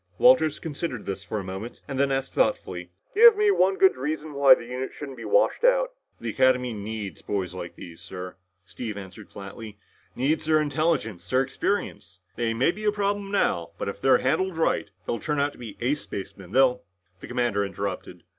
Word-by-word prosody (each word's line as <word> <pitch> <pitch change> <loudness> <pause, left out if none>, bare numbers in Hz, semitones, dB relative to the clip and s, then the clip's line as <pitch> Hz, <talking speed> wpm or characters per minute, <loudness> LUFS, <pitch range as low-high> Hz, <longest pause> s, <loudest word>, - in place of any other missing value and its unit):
Walters 245 - +5
considered 150 -6 -5
this 95 0 -4
for 105 +1 -3
a - - -5
moment 95 +5 -7
and 135 -2 -4
then 140 0 +2
asked 135 0 -2
thoughtfully, 90 -1 0 0.2
"Give 455 +1 +8
me 420 -1 +4
one 190 - +3
good 190 - +5
reason 150 +3 -4
why 140 -2 +7
the 120 - -9
unit 125 +2 -4
shouldn't 140 -3 -7
be - - -7
washed - - +2
out." - - +4 0.3
"The - - -3
academy 125 -2 +2
needs 105 -4 -6
boys 95 -4 -3
like 85 -2 -7
this, 85 -2 -11
sir," 90 0 -7 0.3
Steve 110 -4 -6
answered 100 +1 -10
flatly. 105 +2 -9 0.4
"Needs 140 +6 0
their 155 0 +4
intelligence, 145 - -1
their 130 +4 +3
experience. 135 - -3 0.2
They 115 -1 -1
may 130 +8 +3
be 210 +4 -9
a 210 - +4
problem 205 -1 -1
now, 90 - 0
but - - -3
if 100 0 -7
they're 135 - +5
handled 180 +6 0
right, 160 -9 +1 0.2
they'll 115 - -2
turn 150 -2 -1
out 145 +1 +1
to - - -18
be 115 -4 -8
ace 140 +5 0
spacemen, 95 -2 -8
they'll 125 0 +4 0.2
" 90 +1 -43
The - - -9
commander 120 -5 0
interrupted. 100 -2 -5
130 Hz, 195 wpm, -26 LUFS, 100-155 Hz, 0.4 s, Give